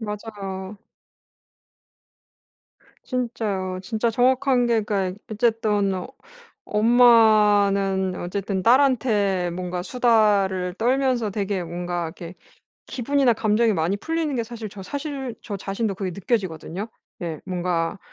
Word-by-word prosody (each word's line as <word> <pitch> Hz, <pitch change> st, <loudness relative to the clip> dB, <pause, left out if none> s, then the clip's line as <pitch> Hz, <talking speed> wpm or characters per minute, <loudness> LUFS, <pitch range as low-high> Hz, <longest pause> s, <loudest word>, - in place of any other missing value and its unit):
맞아요. 205 Hz, -2 st, -6 dB, 2.3 s
진짜요. 210 Hz, -7 st, -3 dB
진짜 225 Hz, +3 st, -1 dB
정확한 250 Hz, +1 st, +2 dB
게 230 Hz, -2 st, +2 dB
그러니까 195 Hz, -2 st, -2 dB
어쨌든 215 Hz, -3 st, +1 dB
어 180 Hz, -1 st, -4 dB, 0.6 s
엄마는 210 Hz, -4 st, +4 dB
어쨌든 190 Hz, +1 st, -3 dB
딸한테 215 Hz, -7 st, +3 dB
뭔가 180 Hz, 0 st, -4 dB
수다를 205 Hz, -6 st, +2 dB
떨면서 245 Hz, -2 st, +1 dB
되게 195 Hz, -2 st, -2 dB
뭔가 175 Hz, 0 st, -3 dB
이렇게 170 Hz, +1 st, -9 dB, 0.5 s
기분이나 265 Hz, 0 st, +1 dB
감정이 220 Hz, +1 st, +2 dB
많이 175 Hz, +2 st, 0 dB
풀리는 320 Hz, +4 st, -2 dB
게 235 Hz, -, 0 dB
사실 225 Hz, -1 st, -7 dB
저 195 Hz, 0 st, -10 dB
사실 275 Hz, 0 st, -5 dB
저 205 Hz, -, -5 dB
자신도 195 Hz, +2 st, -3 dB
그게 190 Hz, -1 st, -3 dB
느껴지거든요. 190 Hz, -1 st, -3 dB, 0.3 s
예. 160 Hz, -3 st, -4 dB
뭔가 180 Hz, 0 st, -2 dB
205 Hz, 255 characters per minute, -23 LUFS, 185-235 Hz, 2.3 s, 엄마는